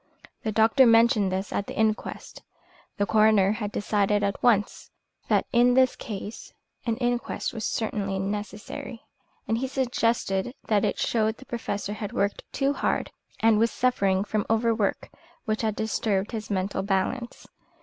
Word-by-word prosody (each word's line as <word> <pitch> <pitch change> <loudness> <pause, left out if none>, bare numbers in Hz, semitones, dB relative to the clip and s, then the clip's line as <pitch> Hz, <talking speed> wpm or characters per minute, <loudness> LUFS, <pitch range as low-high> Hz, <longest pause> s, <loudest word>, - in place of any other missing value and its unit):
The 220 - -2
doctor 225 +5 +5
mentioned 230 -3 +4
this 190 +2 -3
at 200 - -2
the - - -7
inquest 220 0 -2 0.6
the 205 - +1
coroner 215 -2 +4
had 210 -1 -3
decided 205 0 +1
at 200 -1 -1
once 210 -4 +1 0.4
that - - +2
in 245 +1 +5
this 260 -1 +4
case 210 0 -7 0.4
an 225 -1 0
inquest 245 -1 -2
was 225 -2 -4
certainly 200 -3 -2
necessary 210 +3 -5 0.4
and 225 +2 0
he 265 - -1
suggested 240 -4 0
that 210 -2 +2
it - - 0
showed 220 -1 0
the 265 - -14
Professor 205 -4 -4
had 210 -1 -6
worked 200 +1 0
too 275 0 +1
hard - - -1 0.3
and 225 -1 +4
was 230 +1 +3
suffering 200 -7 +1
from 210 0 -1
overwork 225 -2 +1 0.4
which 215 -2 -1
had 220 -2 -1
disturbed 215 -2 -1
his 220 -2 -5
mental 190 -1 -1
balance. 200 +5 -2
220 Hz, 150 wpm, -26 LUFS, 205-235 Hz, 0.6 s, doctor